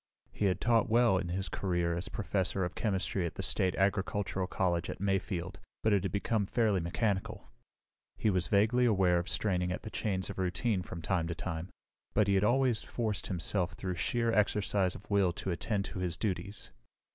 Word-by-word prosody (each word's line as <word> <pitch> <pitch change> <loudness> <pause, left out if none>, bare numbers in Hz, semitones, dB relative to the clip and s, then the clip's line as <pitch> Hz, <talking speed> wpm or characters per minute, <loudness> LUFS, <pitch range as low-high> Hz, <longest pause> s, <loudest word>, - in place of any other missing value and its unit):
He 105 - -1
had 95 -2 +2
taught 115 -1 +3
well 115 -4 +4
in 90 - -3
his 95 +2 -2
career 85 -1 0
as 85 +2 -4
professor 95 -3 -1
of 90 - -4
chemistry 95 -3 -1
at - - -8
the - - -4
State 95 -1 +1
Agricultural 95 -1 0
College 85 -2 0
at - - -5
Mayfield, 95 -2 -1 0.2
but 110 - +3
it 100 - +3
had 95 -1 -2
become 100 +1 0
fairly 110 -4 +2
mechanical. 95 +3 -2 0.7
He 110 - +2
was 90 -2 0
vaguely 110 +5 +3
aware 95 -6 +4
of 85 - -4
straining 90 -4 +1
at 90 - -4
the 110 - -7
chains 95 -3 -1
of - - -7
routine 95 +3 0
from 85 -2 -7
time 85 -1 0
to 85 - -3
time, 85 +1 -4 0.5
but 105 - +4
he 100 - +3
had 95 0 +3
always 125 0 +3
forced 110 -4 -3
himself 90 +1 -1
through 95 -1 -3
sheer 115 +6 0
exercise 100 -3 +2
of 105 - -11
will 100 -3 +4
to 95 - -3
attend 85 +6 -1
to - - -6
his 90 -2 -2
duties. 100 -1 -3
95 Hz, 190 wpm, -32 LUFS, 90-105 Hz, 0.7 s, well